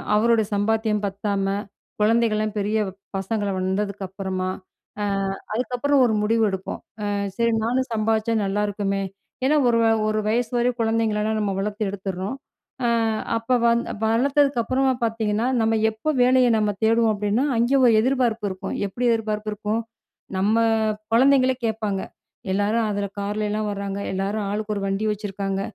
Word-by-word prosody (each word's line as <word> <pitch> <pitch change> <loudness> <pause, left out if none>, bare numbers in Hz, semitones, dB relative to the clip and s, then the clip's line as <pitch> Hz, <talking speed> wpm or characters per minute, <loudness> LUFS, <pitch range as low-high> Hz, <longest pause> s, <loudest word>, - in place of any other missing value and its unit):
அவரோட 230 +1 +4
சம்பாத்தியம் 210 +1 +1
பத்தாம, 200 0 -2 0.6
குழந்தைகள்லாம் 215 -1 +2
பெரிய 210 +2 0 0.4
பசங்களா 200 +1 -2
வந்ததுக்கு 195 +1 -2
அப்பறமா, 190 -1 -3 0.5
அ - - 0 0.5
அதுக்கப்பறம் 255 +4 +2
ஒரு 230 - +1
முடிவு 225 +1 +2
எடுப்போம். 190 0 -5 0.2
அ - - -1 0.3
சரி 235 0 +2
நானும் 255 +3 0
சம்பாதிச்சா 220 +1 +1
நல்லாயிருக்குமே! 200 0 -1 0.4
ஏன்னா, 295 +3 +3
ஒரு 235 - +3
வ - - +3 0.2
ஒரு 215 0 +1
வயசு 230 +1 0
வரை 240 +1 +3
குழந்தைங்கள 225 -1 +1
எல்லாம் 220 0 0
நம்ம 200 -2 0
வளர்த்து 210 +2 -2
எடுத்துட்றோம். 195 +3 -4 0.5
அ - - +3 0.5
அப்ப 240 +3 +1
வந் 235 0 +3 0.2
வளத்ததுக்கு 270 +3 +2
அப்புறமா 260 +3 +1
பார்த்தீங்கன்னா, 225 0 0
நம்ம 225 0 +2 0.2
எப்போ 220 +8 -4
வேலைய 255 0 +5
நம்ம 210 -1 +1 0.2
தேடுவோம் 225 0 +3
அப்பிடின்னா, 210 +5 0
அங்கே 240 +4 +3
ஒரு 235 - +6
எதிர்பார்ப்பு 235 -4 +1
இருக்கும். 190 +1 -5
எப்பிடி 240 +6 -3
எதிர்பார்ப்பு 215 -1 -2
இருக்கும்? 210 +2 -2 0.6
நம்ம 205 +4 +2 0.6
குழந்தைங்களே 260 +1 +5
கேட்பாங்க. 215 -3 -1 0.5
எல்லாரும் 210 +3 +1
அதில 205 -1 -1
கார்ல 205 +1 -2
எல்லாம் 215 0 -1
வராங்க. 200 0 -4
எல்லாரும் 200 +2 -2
ஆளுக்கு 210 +1 -2
ஒரு 200 - -3
வண்டி 195 +2 -1
வச்சுருக்காங்க. 195 -2 -3
215 Hz, 140 wpm, -23 LUFS, 200-230 Hz, 0.6 s, ஒரு